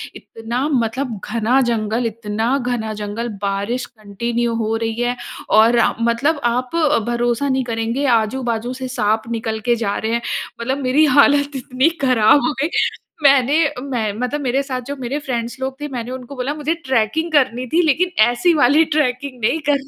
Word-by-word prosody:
इतना 235 Hz, +5 st, -4 dB
मतलब 240 Hz, -3 st, -1 dB
घना 235 Hz, +3 st, +2 dB
जंगल, 225 Hz, +1 st, -1 dB
इतना 225 Hz, +3 st, -1 dB
घना 240 Hz, -4 st, -2 dB
जंगल 210 Hz, +3 st, -4 dB
बारिश 200 Hz, +5 st, -2 dB
कंटिन्यू 235 Hz, +2 st, -3 dB
हो 220 Hz, +1 st, -1 dB
रही 225 Hz, 0 st, -2 dB
है। 245 Hz, 0 st, 0 dB, 0.3 s
और 225 Hz, +2 st, +5 dB
अ, -, -, +3 dB
मतलब 235 Hz, +7 st, +1 dB
आप 250 Hz, +4 st, -1 dB
अ, 300 Hz, -5 st, +3 dB
भरोसा 240 Hz, +3 st, 0 dB
नहीं 260 Hz, 0 st, +1 dB
करेंगे 230 Hz, +3 st, -2 dB
आजू-बाजू 235 Hz, +1 st, -2 dB
से 260 Hz, 0 st, -5 dB
साँप 215 Hz, +2 st, +1 dB
निकल 225 Hz, -1 st, -2 dB
के 240 Hz, -, +5 dB
जा 200 Hz, -, -1 dB
रहे 220 Hz, +1 st, -2 dB
हैं। 235 Hz, -, 0 dB, 0.4 s
मतलब 260 Hz, +4 st, -1 dB
मेरी 265 Hz, +5 st, +4 dB
हालत 285 Hz, 0 st, +4 dB
इतनी 260 Hz, +3 st, +1 dB, 0.2 s
खराब 250 Hz, +1 st, +5 dB
हो -, -, -1 dB
गई 300 Hz, -, +1 dB, 0.5 s
मैंने 280 Hz, +3 st, +5 dB
अ, 290 Hz, -3 st, -7 dB
मैं 245 Hz, -6 st, -2 dB
मतलब 250 Hz, +4 st, -2 dB
मेरे 265 Hz, +1 st, 0 dB
साथ 260 Hz, -2 st, -4 dB
जो 285 Hz, -, -3 dB
मेरे 275 Hz, +5 st, -2 dB
फ्रेंड्स 240 Hz, +1 st, -3 dB
लोग 265 Hz, +1 st, -4 dB
थे 295 Hz, -, -3 dB
मैंने 240 Hz, +1 st, -5 dB
उनको 260 Hz, +1 st, -8 dB
बोला 255 Hz, +2 st, -2 dB
"मुझे 305 Hz, +1 st, -1 dB
ट्रेकिंग 260 Hz, +6 st, 0 dB
करनी 255 Hz, -4 st, +1 dB
थी 340 Hz, -, +5 dB
लेकिन 345 Hz, +5 st, +2 dB, 0.2 s
ऐसी 245 Hz, +9 st, +2 dB
वाली 290 Hz, +6 st, +5 dB
ट्रेकिंग 255 Hz, -2 st, -1 dB
नहीं 310 Hz, +9 st, +2 dB
करनी 280 Hz, -1 st, +1 dB
245 Hz, 180 wpm, -19 LUFS, 230-275 Hz, 0.5 s, और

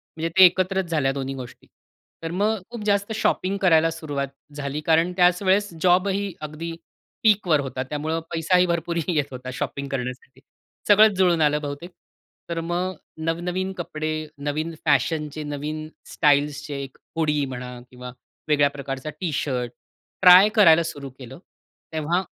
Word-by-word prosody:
म्हणजे 165 Hz, +1 st, -2 dB
ते 190 Hz, -, +10 dB
एकत्रच 185 Hz, +1 st, +2 dB
झाल्या 145 Hz, -4 st, +1 dB
दोन्ही 135 Hz, -1 st, -4 dB
गोष्टी. 130 Hz, -1 st, -10 dB, 0.6 s
तर 165 Hz, -, -3 dB
मग 210 Hz, +4 st, 0 dB
खूप 235 Hz, -3 st, -6 dB
जास्त 200 Hz, +1 st, +1 dB
शॉपिंग 200 Hz, -2 st, 0 dB
करायला 165 Hz, -3 st, +4 dB
सुरुवात 145 Hz, -4 st, -4 dB, 0.3 s
झाली. 145 Hz, +1 st, -4 dB
कारण 165 Hz, +3 st, +2 dB
त्याच 180 Hz, 0 st, +4 dB
वेळेस 200 Hz, +2 st, +2 dB
जॉबही 190 Hz, +2 st, +2 dB
अगदी 155 Hz, +2 st, -6 dB, 0.5 s
पीकवर 200 Hz, -8 st, +4 dB
होता. 130 Hz, -2 st, -3 dB
त्यामुळे 150 Hz, +4 st, -3 dB
पैसाही 175 Hz, +2 st, +3 dB
भरपूर 170 Hz, -1 st, -2 dB
येत 155 Hz, -6 st, +1 dB
होता 130 Hz, 0 st, -7 dB
शॉपिंग 140 Hz, +2 st, -4 dB
करण्यासाठी. 130 Hz, 0 st, -5 dB, 0.5 s
सगळंच 210 Hz, -1 st, +6 dB
जुळून 175 Hz, -3 st, +3 dB
आलं 150 Hz, 0 st, +2 dB
बहुतेक. 145 Hz, +4 st, -6 dB, 0.6 s
तर 170 Hz, -1 st, -2 dB
मग 175 Hz, +3 st, -2 dB, 0.3 s
नवनवीन 180 Hz, +3 st, -2 dB
कपडे, 155 Hz, -2 st, -4 dB
नवीन 150 Hz, +3 st, -3 dB
फॅशनचे, 150 Hz, +1 st, 0 dB
नवीन 150 Hz, +1 st, -5 dB, 0.3 s
स्टाईल्सचे 145 Hz, 0 st, +1 dB
एक 135 Hz, -, -11 dB, 0.2 s
हुडी 150 Hz, -3 st, +1 dB
म्हणा 125 Hz, -1 st, -7 dB
किंवा 125 Hz, 0 st, -9 dB, 0.4 s
वेगळ्या 145 Hz, -2 st, +3 dB
प्रकारचा 140 Hz, 0 st, -6 dB
टी-शर्ट 135 Hz, -7 st, -2 dB, 0.5 s
ट्राय 185 Hz, +2 st, +9 dB
करायला 170 Hz, -6 st, +6 dB
सुरू 145 Hz, -4 st, -6 dB
केलं, 130 Hz, +2 st, -10 dB, 0.5 s
तेव्हा 160 Hz, +4 st, 0 dB
155 Hz, 140 wpm, -23 LUFS, 145-180 Hz, 0.6 s, ते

